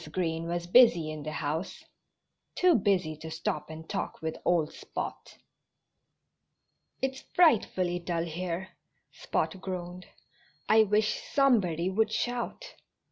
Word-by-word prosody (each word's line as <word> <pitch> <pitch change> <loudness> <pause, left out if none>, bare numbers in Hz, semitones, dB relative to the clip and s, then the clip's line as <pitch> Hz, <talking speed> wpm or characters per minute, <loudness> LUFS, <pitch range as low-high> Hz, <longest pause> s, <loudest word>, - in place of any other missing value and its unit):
Green 165 -2 -2
was 175 0 -2
busy 175 -6 +5
in 155 -1 -6
the 155 +1 -5
house 155 +4 -3 0.7
too 365 -1 +5
busy 185 - +1
to 160 +1 -8
stop 160 0 -3
and 160 0 -9
talk - - -4
with 160 0 -3
old 165 -3 +1
Spot. - - -7 1.7
"It's 265 0 -1
frightfully 190 - +3
dull 170 -1 -2
here," 175 +2 -4 0.4
Spot 190 - -2
groaned. 180 -1 -6 0.6
"I 220 0 +6
wish 210 +1 +1
somebody 200 - +3
would 215 +2 +1
shout." 245 +1 -3
180 Hz, 120 wpm, -29 LUFS, 160-215 Hz, 1.7 s, I